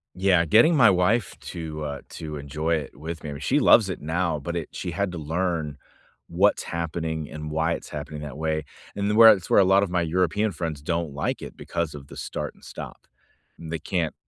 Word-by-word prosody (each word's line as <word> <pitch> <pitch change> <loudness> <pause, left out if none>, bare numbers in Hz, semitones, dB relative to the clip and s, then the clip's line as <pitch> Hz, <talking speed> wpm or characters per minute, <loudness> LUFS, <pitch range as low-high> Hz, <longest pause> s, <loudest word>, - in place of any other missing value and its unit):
Yeah, 90 -2 +3
getting 115 - +5
my 120 -8 +7
wife 95 +4 +2
to, 80 -2 -6
uh, 70 -1 -5
to 75 -2 -6
enjoy 75 +4 -1
it 75 -3 -5
with 80 +2 -7
me, 75 - -5
I - - -4
mean- 70 - -7
she 145 - +2
loves 115 -6 +6
it 95 - -4
now- 85 +1 -1
but 85 +5 -5
it 85 -3 -3
she 90 - -5
had 100 +2 -1
to - - -5
learn 80 -1 -2 0.5
what's 95 +4 +2
happening 80 -2 -3
and 75 0 -6
why 80 +2 +1
it's - - -6
happening 75 0 -6
that 75 -3 -7
way. 80 -1 -1 0.3
And 100 0 -1
the - - +1
where 115 0 +10
it's 95 -4 -6
where - - +6
a - - +7
lotta 95 +1 +4
my 90 -1 0
European 90 +5 +1
friends 80 -4 -4
don't 85 -1 -2
like 70 - -2
it - - -9
because 85 -3 -3
of 70 -2 -10
the - - -11
start - - -4
and - - -24
stop. - - -9 0.5
They 80 0 -5
can't 85 0 -1
85 Hz, 220 wpm, -25 LUFS, 75-95 Hz, 0.5 s, where